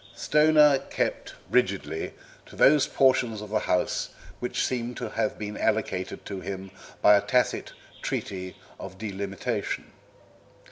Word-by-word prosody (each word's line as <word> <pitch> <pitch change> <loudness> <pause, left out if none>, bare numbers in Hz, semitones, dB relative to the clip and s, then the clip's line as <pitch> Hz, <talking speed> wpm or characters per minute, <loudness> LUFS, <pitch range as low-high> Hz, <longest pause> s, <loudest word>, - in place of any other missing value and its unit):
Stoner 150 -2 +5
kept - - -3 0.2
rigidly 95 -10 0 0.3
to - - -13
those 145 -1 +5
portions 130 -5 +2
of 105 0 -8
the 110 - +2
house 90 -3 0 0.3
which 125 +1 -1
seemed 125 -1 -3
to - - -4
have 135 0 -1
been 105 0 -5
allotted 95 -4 -1
to 100 -2 -5
him 95 0 -6 0.3
by 105 - +8
a 100 - +4
tacit 125 +2 0 0.3
treaty 95 -1 -4 0.2
of 95 0 -8
delimitation. 100 -2 -4
105 Hz, 130 wpm, -27 LUFS, 95-125 Hz, 0.3 s, by